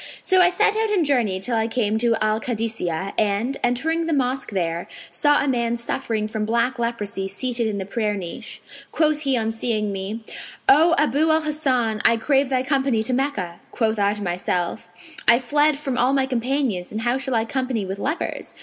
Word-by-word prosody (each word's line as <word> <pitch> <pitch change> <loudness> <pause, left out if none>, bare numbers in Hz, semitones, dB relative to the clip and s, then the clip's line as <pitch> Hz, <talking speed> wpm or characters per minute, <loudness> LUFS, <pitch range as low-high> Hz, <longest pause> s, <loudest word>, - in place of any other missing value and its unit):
So 375 -1 +4
I 355 - +6
set 425 +3 +2
out 440 0 +1
and 385 -6 +2
journeyed 225 -9 0
till 235 +3 0
I 225 0 +1
came 220 -2 0
to 235 0 +2
Al 215 0 +1
Kadisνyah[FN#502] 210 -7 -2
and, 215 +6 0
entering 320 +7 0
the 330 - 0
mosque 260 -1 0
there, 170 -3 -2 0.2
saw 290 0 +3
a - - -2
man 235 -3 0
suffering 230 -2 -2
from 220 0 -3
black 235 +3 0
leprosy 205 -5 -2
seated 235 +3 -1
in 210 -2 -2
the 190 - -4
prayer 210 +1 -1
niche. 175 -4 -7 0.3
Quoth 310 -1 +2
he 275 -4 +1
on 225 -1 0
seeing 220 -2 -1
me, 200 +4 -5 0.4
'O 325 +5 +6
Abu 300 +2 +2
al 315 0 +3
Hasan, 255 -8 0
I 230 - +5
crave 275 +3 +2
thy 255 -1 +1
company 265 -4 +1
to 250 - -1
Meccah.' 215 -11 -2
Quoth 220 -2 0
I 200 +1 +2
to 205 - -6
myself, 175 -1 -2 0.4
'I 235 - +7
fled 290 +4 +2
from 270 -4 -3
all 255 +2 +3
my 270 -1 +2
companions, 250 -6 -1
and 215 - -3
how 240 +3 +1
shall 265 -2 -2
I 225 0 +1
company 255 -4 -2
with 190 +1 -5
lepers?' 300 +10 -3
235 Hz, 195 wpm, -22 LUFS, 215-275 Hz, 0.4 s, I